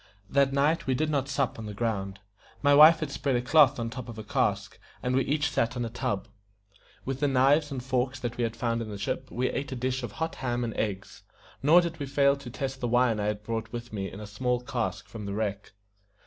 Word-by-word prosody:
That 140 Hz, -1 st, +3 dB
night 145 Hz, +4 st, +1 dB
we 130 Hz, -, +2 dB
did 155 Hz, +3 st, 0 dB
not 140 Hz, -2 st, 0 dB
sup 140 Hz, -4 st, -1 dB
on 110 Hz, -, -6 dB
the 105 Hz, -, -7 dB
ground. 100 Hz, -3 st, -2 dB, 0.5 s
My 145 Hz, 0 st, +5 dB
wife 155 Hz, +3 st, +8 dB
had 150 Hz, -3 st, -3 dB
spread 135 Hz, -1 st, -1 dB
a 120 Hz, -, +1 dB
cloth 145 Hz, +1 st, +5 dB
on 115 Hz, -, -2 dB
the -, -, -9 dB
top 125 Hz, -1 st, -6 dB
of 115 Hz, -, -8 dB
a 110 Hz, -, -6 dB
cask, 105 Hz, -, -1 dB, 0.2 s
and 125 Hz, 0 st, 0 dB
we 135 Hz, -, +3 dB
each 145 Hz, 0 st, 0 dB
sat 115 Hz, +2 st, 0 dB
on 120 Hz, -, -1 dB
a 115 Hz, -, -5 dB
tub. 100 Hz, -3 st, -2 dB, 0.8 s
With 135 Hz, 0 st, -3 dB
the 145 Hz, -, +2 dB
knives 140 Hz, +3 st, +3 dB
and 130 Hz, -4 st, -5 dB
forks 130 Hz, 0 st, -1 dB
that 120 Hz, -1 st, -3 dB
we 120 Hz, -, -1 dB
had 115 Hz, 0 st, -2 dB
found 115 Hz, 0 st, -1 dB
in 110 Hz, -, -5 dB
the 105 Hz, -, -6 dB
ship 130 Hz, +6 st, -3 dB
we 125 Hz, +2 st, -1 dB
ate 140 Hz, 0 st, -4 dB
a -, -, -4 dB
dish 130 Hz, +1 st, -1 dB
of 120 Hz, -5 st, -6 dB
hot 160 Hz, 0 st, -3 dB
ham 120 Hz, -2 st, -1 dB
and 115 Hz, -2 st, -3 dB
eggs, 100 Hz, -2 st, -4 dB, 0.4 s
nor 160 Hz, +6 st, +6 dB
did 170 Hz, -2 st, -4 dB
we 140 Hz, -, -3 dB
fail 140 Hz, 0 st, +3 dB
to 140 Hz, -3 st, -9 dB
test 135 Hz, +2 st, -4 dB
the 120 Hz, -, -1 dB
wine 120 Hz, -1 st, +3 dB
that 105 Hz, -, -2 dB
I -, -, 0 dB
had 105 Hz, 0 st, -2 dB
brought 115 Hz, 0 st, -4 dB
with 120 Hz, -1 st, -7 dB
me 95 Hz, -2 st, -3 dB
in 100 Hz, -, -9 dB
a 105 Hz, -, -7 dB
small 125 Hz, +4 st, -1 dB
cask 105 Hz, -6 st, -3 dB
from 105 Hz, -3 st, -7 dB
the 100 Hz, -, -3 dB
wreck. 105 Hz, -2 st, -3 dB
125 Hz, 260 wpm, -28 LUFS, 115-140 Hz, 0.8 s, wife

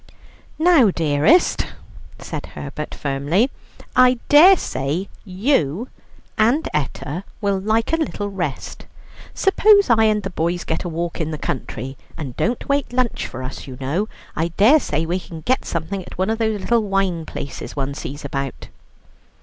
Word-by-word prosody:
"Now, 315 Hz, -, +5 dB
dearest," 160 Hz, -, +3 dB, 0.5 s
said -, -, -6 dB
Herbert -, -, -7 dB
firmly, 145 Hz, -, 0 dB, 0.4 s
"I 255 Hz, 0 st, +6 dB
dare 355 Hz, +6 st, +8 dB
say 145 Hz, -, -3 dB
you 195 Hz, -, 0 dB, 0.5 s
and 240 Hz, +9 st, +3 dB
Etta 150 Hz, +3 st, -3 dB, 0.2 s
will 200 Hz, -2 st, 0 dB
like 220 Hz, +7 st, 0 dB
a -, -, +4 dB
little 290 Hz, -10 st, -2 dB
rest. 170 Hz, -8 st, -5 dB, 0.5 s
Suppose 405 Hz, -, +5 dB
I 220 Hz, -1 st, +5 dB
and 210 Hz, -1 st, +2 dB
the 195 Hz, -, -4 dB
boys 175 Hz, +1 st, -1 dB
get 160 Hz, -, -2 dB
a 175 Hz, -, -3 dB
walk 170 Hz, +1 st, -3 dB
in 160 Hz, -, -2 dB
the 155 Hz, -, -4 dB
country; 135 Hz, -1 st, -4 dB, 0.2 s
and 140 Hz, -6 st, -6 dB
don't 235 Hz, +3 st, -1 dB
wait 280 Hz, -2 st, 0 dB
lunch 250 Hz, -1 st, 0 dB
for 130 Hz, +1 st, -7 dB
us, 130 Hz, +2 st, -7 dB
you 130 Hz, -2 st, -8 dB
know. 160 Hz, +11 st, -1 dB, 0.3 s
I 165 Hz, +2 st, 0 dB
dare 210 Hz, -, +5 dB
say 155 Hz, -, -1 dB
we 175 Hz, +3 st, -1 dB
can 165 Hz, -3 st, -10 dB
get 255 Hz, +9 st, 0 dB
something 170 Hz, +4 st, -3 dB
at 180 Hz, -, -11 dB
one 190 Hz, +4 st, +1 dB
of 225 Hz, -, -2 dB
those 220 Hz, -2 st, 0 dB
little 235 Hz, +2 st, +2 dB
wine 195 Hz, -5 st, 0 dB
places 140 Hz, -, -6 dB
one 140 Hz, -1 st, -2 dB
sees 145 Hz, +1 st, -7 dB
about." 135 Hz, -1 st, -4 dB
190 Hz, 160 wpm, -21 LUFS, 150-235 Hz, 0.5 s, dare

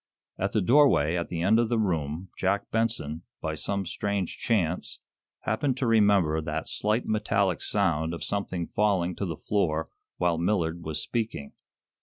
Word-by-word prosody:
At 95 Hz, +1 st, -1 dB
the 110 Hz, -, +2 dB
doorway 115 Hz, -, +4 dB
at 85 Hz, -1 st, -2 dB
the 85 Hz, -1 st, -2 dB
end 110 Hz, +5 st, +4 dB
of 120 Hz, -1 st, +1 dB
the 120 Hz, -, +1 dB
room 85 Hz, -3 st, -1 dB
Jack 100 Hz, +2 st, -1 dB
Benson, 110 Hz, -9 st, 0 dB, 0.2 s
by 80 Hz, -1 st, -3 dB
some 100 Hz, +5 st, -2 dB
strange 100 Hz, 0 st, -2 dB
chance, 90 Hz, -7 st, 0 dB, 0.4 s
happened 125 Hz, +4 st, 0 dB
to 130 Hz, -, -1 dB
remember 100 Hz, -8 st, +4 dB
that 75 Hz, 0 st, -3 dB
slight 105 Hz, +3 st, 0 dB
metallic 100 Hz, -4 st, +1 dB
sound 80 Hz, -6 st, +1 dB
of 85 Hz, -, -5 dB
something 95 Hz, -4 st, -2 dB
falling 95 Hz, -4 st, +1 dB
to 100 Hz, -, -2 dB
the 80 Hz, -3 st, -4 dB
floor 80 Hz, -6 st, 0 dB, 0.3 s
while 85 Hz, -2 st, +1 dB
Millard 85 Hz, -2 st, 0 dB
was 80 Hz, -1 st, -3 dB
speaking. 110 Hz, -, -3 dB
95 Hz, 160 wpm, -27 LUFS, 80-105 Hz, 0.4 s, doorway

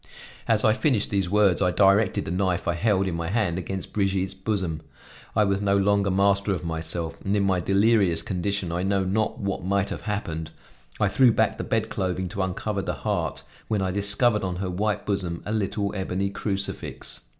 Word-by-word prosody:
As 110 Hz, -2 st, +2 dB
I 110 Hz, -, +5 dB
finished 125 Hz, -4 st, +1 dB
these 95 Hz, -3 st, 0 dB
words 100 Hz, -3 st, +3 dB
I 90 Hz, -, +3 dB
directed 100 Hz, +2 st, +3 dB
the -, -, -4 dB
knife 90 Hz, -1 st, 0 dB
I 85 Hz, -, +2 dB
held 95 Hz, +1 st, +1 dB
in 90 Hz, -, -2 dB
my 85 Hz, 0 st, -3 dB
hand 95 Hz, -3 st, 0 dB
against 95 Hz, +2 st, -5 dB
Brigitte's 95 Hz, -2 st, 0 dB
bosom. 95 Hz, -5 st, -2 dB, 0.5 s
I 105 Hz, -, +4 dB
was 100 Hz, -1 st, 0 dB
no 100 Hz, -1 st, +2 dB
longer 100 Hz, 0 st, +2 dB
master 100 Hz, +1 st, +2 dB
of 90 Hz, -2 st, -4 dB
myself, 80 Hz, 0 st, -3 dB
and 100 Hz, +1 st, 0 dB
in 100 Hz, -, +2 dB
my 95 Hz, -2 st, +2 dB
delirious 95 Hz, -2 st, +3 dB
condition 95 Hz, 0 st, -2 dB
I 85 Hz, +1 st, -1 dB
know 95 Hz, 0 st, +1 dB
not 100 Hz, +4 st, 0 dB
what 100 Hz, -3 st, -3 dB
might 100 Hz, +2 st, 0 dB
have -, -, -4 dB
happened; 85 Hz, -7 st, -3 dB, 0.5 s
I 105 Hz, -, +3 dB
threw 120 Hz, +5 st, +5 dB
back 110 Hz, -1 st, +1 dB
the -, -, -2 dB
bedclothing 95 Hz, -5 st, -1 dB
to 100 Hz, -, -3 dB
uncover 100 Hz, +2 st, -2 dB
the -, -, -3 dB
heart, -, -, -2 dB, 0.2 s
when 105 Hz, -3 st, 0 dB
I 95 Hz, -, 0 dB
discovered 100 Hz, +3 st, +3 dB
on 90 Hz, -1 st, -2 dB
her 90 Hz, 0 st, -3 dB
white 105 Hz, +3 st, -1 dB
bosom 95 Hz, -4 st, -2 dB
a 105 Hz, -, -3 dB
little 100 Hz, -1 st, -1 dB
ebony 95 Hz, 0 st, -2 dB
crucifix. 100 Hz, -1 st, -4 dB
100 Hz, 195 wpm, -25 LUFS, 90-105 Hz, 0.5 s, I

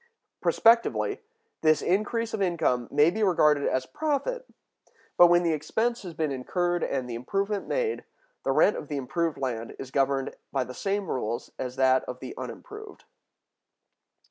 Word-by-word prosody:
Prospectively, 230 Hz, +1 st, +3 dB, 0.4 s
this 155 Hz, -1 st, +3 dB
increase 220 Hz, +5 st, 0 dB
of 210 Hz, -, -2 dB
income 160 Hz, -10 st, +1 dB
may 150 Hz, +3 st, +4 dB
be 220 Hz, +4 st, -3 dB
regarded 150 Hz, -7 st, +3 dB
as 130 Hz, -, 0 dB
profit; 315 Hz, -, -2 dB, 0.7 s
but, 175 Hz, -, +8 dB
when 175 Hz, +1 st, +4 dB
the 165 Hz, -2 st, +2 dB
expense 225 Hz, +11 st, -1 dB
has 180 Hz, -5 st, -8 dB
been 155 Hz, -2 st, -1 dB
incurred 175 Hz, +6 st, -1 dB
and 130 Hz, -2 st, -2 dB
the 120 Hz, -, -5 dB
improvement 195 Hz, -, -2 dB
made, 475 Hz, -3 st, -1 dB, 0.4 s
the -, -, +1 dB
rent 210 Hz, -, +4 dB
of -, -, -7 dB
the 145 Hz, -, -3 dB
improved 165 Hz, +4 st, -1 dB
land 115 Hz, -4 st, -4 dB
is 130 Hz, -1 st, -8 dB
governed 135 Hz, 0 st, 0 dB, 0.2 s
by 135 Hz, -2 st, 0 dB
the 125 Hz, +1 st, -9 dB
same 200 Hz, +5 st, -2 dB
rules 120 Hz, -2 st, -3 dB
as 125 Hz, -1 st, -4 dB
that 130 Hz, 0 st, +3 dB
of 125 Hz, 0 st, -7 dB
the -, -, -7 dB
unimproved. 430 Hz, -3 st, -9 dB
165 Hz, 160 wpm, -27 LUFS, 130-210 Hz, 0.7 s, but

